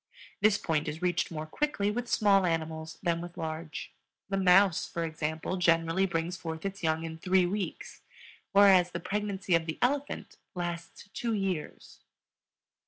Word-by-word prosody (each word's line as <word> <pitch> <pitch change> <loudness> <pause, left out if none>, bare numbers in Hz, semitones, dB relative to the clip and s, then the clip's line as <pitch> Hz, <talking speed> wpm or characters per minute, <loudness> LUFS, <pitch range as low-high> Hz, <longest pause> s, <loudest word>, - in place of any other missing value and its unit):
This 205 0 +4
point 155 -3 -1
is 155 +3 -5
reached 180 0 +1
more 155 -2 -5
quickly 205 - -1
with 240 +2 -3
small 200 -4 +4
animals 160 -1 -3
than 170 -2 +1
with 175 +1 -9
large. 160 -1 -5 0.4
The 195 - 0
mouse, 190 -1 +5
for 170 - -3
example, 160 +2 -3
generally 170 +2 +3
brings 170 0 -2
forth 160 -1 -6
its 195 0 -4
young 160 -1 0
in 160 0 -6
three 185 +1 +3
weeks, 195 +1 -4 0.5
whereas 195 -3 +6
the 170 - -2
pregnancy 200 0 -2
of 165 0 +3
the 160 - -3
elephant 280 +3 -1 0.2
lasts 175 +2 -5
two 235 -1 -2
years. 190 -6 -4
175 Hz, 155 wpm, -30 LUFS, 165-195 Hz, 0.5 s, whereas